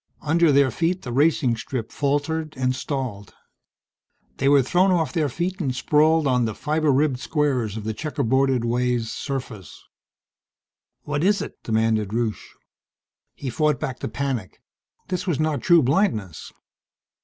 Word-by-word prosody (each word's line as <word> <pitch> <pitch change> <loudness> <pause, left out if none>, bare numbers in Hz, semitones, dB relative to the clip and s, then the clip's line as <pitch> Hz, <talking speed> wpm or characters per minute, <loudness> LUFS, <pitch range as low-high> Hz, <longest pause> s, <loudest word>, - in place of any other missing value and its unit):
Under 165 +1 +3
their 140 -2 +4
feet 175 +8 -1
the 125 - -5
racing 135 -2 +2
strip 115 0 -5
faltered 150 +2 -1
and 130 0 0
stalled. 130 -8 -5 1.0
They 135 - +2
were 140 -1 +5
thrown 180 +9 +2
off 165 -7 +1
their 155 -4 +1
feet 180 +7 -3
and 130 -5 -1
sprawled 155 +4 +3
on 125 -3 +2
the 110 -2 -3
fiber 155 0 0
ribbed 135 -1 +1
squares 130 -9 -1
of 110 - -6
the 110 +1 -3
checkerboarded 130 -1 0
way's 120 -1 0
surface. 125 - -6 1.2
"What 145 +1 -2
is 205 +2 +3
it?" - - -7
demanded 110 -2 0
Rusche. 115 -3 -3 0.8
He 135 -3 -5
fought 150 +1 +1
back 125 -2 -4
the - - -4
panic. 135 -9 -4 0.5
This 185 +1 -3
was 165 -6 0
not 155 -2 0
true 170 -4 +5
blindness. 125 - 0
135 Hz, 145 wpm, -23 LUFS, 120-155 Hz, 1.2 s, were